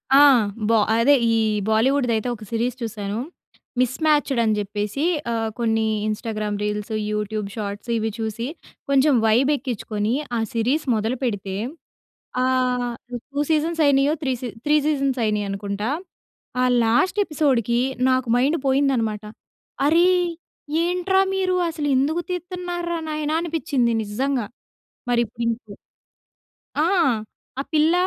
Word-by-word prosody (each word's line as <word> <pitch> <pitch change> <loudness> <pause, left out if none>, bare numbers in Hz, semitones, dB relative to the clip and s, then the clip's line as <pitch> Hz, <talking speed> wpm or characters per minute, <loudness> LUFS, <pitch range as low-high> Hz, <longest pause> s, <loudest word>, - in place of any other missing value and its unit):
ఆ! - - +8 0.5
బా 230 - +5 0.2
అదే 245 +5 +5 0.2
ఈ - - +3 0.4
బాలీవుడ్‌ది 245 +3 +2
అయితే 220 +2 -1
ఒక 215 - -12
సిరీస్ 235 +2 0
చూసాను. 210 -2 -4 0.6
మిస్‌మ్యాచ్‌డ్ 280 +1 +2
అని 220 -1 +2
చెప్పేసి 210 +6 -3 0.3
ఆహ్, 225 -1 -1
కొన్ని 225 -1 +1 0.2
ఇంస్టాగ్రామ్ 215 -1 -3
రీల్స్, 210 +1 -3 0.2
యూట్యూబ్ 210 0 -2
షార్ట్స్ 205 +1 -5
ఇవి 220 0 -1
చూసి 225 +2 -3 0.4
కొంచెం 280 +1 +4
వైబ్ 235 +5 +4
ఎక్కించుకొని 220 -4 -2 0.2
ఆ - - 0
సిరీస్ 250 +7 +1
మొదలుపెడితే 220 -3 -2 0.9
ఆహ్, 250 -1 +1 0.4
2 285 - 0
seasons 320 +2 +1
అయినాయో? 280 +1 +4
Three 265 -2 +1
see 250 - -3 0.2
three 295 +1 +4
seasons 275 -3 +1
అయినాయి 210 -1 0
అనుకుంటా. 200 +2 -3 0.7
ఆ - - +4 0.2
లాస్ట్ 345 - +2
ఎపిసోడ్‌కి 260 - +1 0.3
నాకు 255 -1 +1
మైండ్ 280 +7 +2
పోయిందన్నమాట. 260 -6 +1 0.6
"అరే 335 +4 +5 0.8
ఏంట్రా 360 +2 +2
మీరు 375 -1 +1
అసలు 300 -2 -3
ఎందుకు 295 +6 +1
తీతున్నారా 350 -1 -3
నాయనా?", 305 0 -1
అనిపించింది 310 -7 0
నిజంగా. 245 +3 -1 0.7
మరి 240 - +3
ఇప్పుడు 235 +2 -7
ఇంకా 225 -3 -5 1.0
ఆ! 295 - +1 0.8
ఆ - - +1
పిల్ల 310 +2 +4
250 Hz, 120 wpm, -23 LUFS, 220-295 Hz, 1.0 s, ఆ